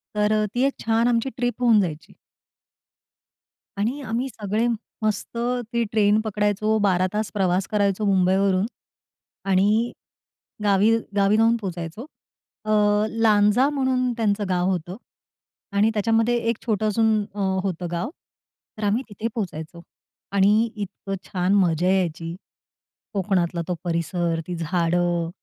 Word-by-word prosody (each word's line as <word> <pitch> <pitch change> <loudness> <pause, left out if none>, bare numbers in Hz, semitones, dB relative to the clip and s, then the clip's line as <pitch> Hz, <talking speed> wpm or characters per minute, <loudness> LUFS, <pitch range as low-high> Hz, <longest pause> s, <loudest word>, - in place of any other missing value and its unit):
तर 210 0 +2
अ, 215 0 +2
ती 245 - +1
एक 275 - -2
छान 225 +1 +1
आमची 240 +2 +1
ट्रिप 245 0 -2
होऊन 235 -3 +5
जायची. 160 -4 -5 1.6
आणि 235 +8 -1
आम्ही 240 +4 -1
सगळे 215 0 -1 0.3
मस्त 215 +1 -2 0.4
ती 235 0 +2
ट्रेन 210 -1 +3
पकडायचो. 215 +1 +1
12 185 -3 +2
तास 215 0 -2
प्रवास 185 -2 +1
करायचो 205 0 +1
मुंबईवरून, 190 0 +2 0.8
आणि 210 +5 +3 0.7
गावी 205 +3 +4 0.2
गावी 200 +1 +3
जाऊन 225 +1 +4
पोहोचायचो. 175 +3 -5 0.6
अ, 215 - -1 0.5
लांजा 215 +4 +4
म्हणून 260 -3 0
त्यांचं 210 -2 +1
गाव 180 0 +1
होतं 180 -1 -3 0.8
आणि 215 +2 +4
त्याच्यामध्ये 225 +3 +2
एक 230 - 0
छोटं 215 -2 0
अजून 220 +1 +2 0.2
अ, - - -6 0.2
होतं 180 -2 -3
गाव. 175 +5 -2 0.7
तर 215 - -6
आम्ही 210 +5 +1
तिथे 215 +2 -4
पोहोचायचो. 170 -6 -5 0.5
आणि 205 +4 +3
इतकं 200 -1 -5
छान 185 +1 0
मजा 175 -3 +2
यायची. 170 -3 -1 0.8
कोकणातला 180 -3 0
तो 180 - -1
परिसर 170 0 -1
ती 180 - -3
झाडं 170 0 0
205 Hz, 125 wpm, -23 LUFS, 180-220 Hz, 1.6 s, होऊन